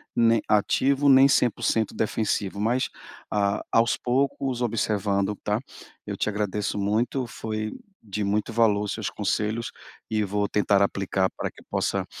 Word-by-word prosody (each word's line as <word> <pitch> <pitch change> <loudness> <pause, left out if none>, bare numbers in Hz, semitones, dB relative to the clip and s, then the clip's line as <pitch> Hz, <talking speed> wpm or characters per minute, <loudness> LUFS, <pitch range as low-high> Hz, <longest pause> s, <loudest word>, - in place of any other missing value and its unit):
nem 115 -1 +4
ativo, 135 +7 +2
nem 135 0 +8
100% 115 -4 +1
defensivo 105 -2 -1
mas 120 +5 +1 0.4
a 100 -1 +1
aos 115 +1 +3
poucos 130 0 0
observando, 105 -3 0
tá? 105 +1 0 0.5
Eu - - -5
te - - -1
agradeço 105 0 -2
muito, 115 +6 0
foi 110 -1 -4 0.3
de 105 -1 -4
muito 105 +3 0
valor 110 -3 +3
os - - -3
seus - - -3
conselhos, 110 +2 -1 0.4
e 110 -1 +1
vou 105 +1 -1
tentar 100 -1 +2
aplicar 95 -1 +1
pra - - -3
que - - -17
possa, - - -1
105 Hz, 145 wpm, -25 LUFS, 100-115 Hz, 0.5 s, nem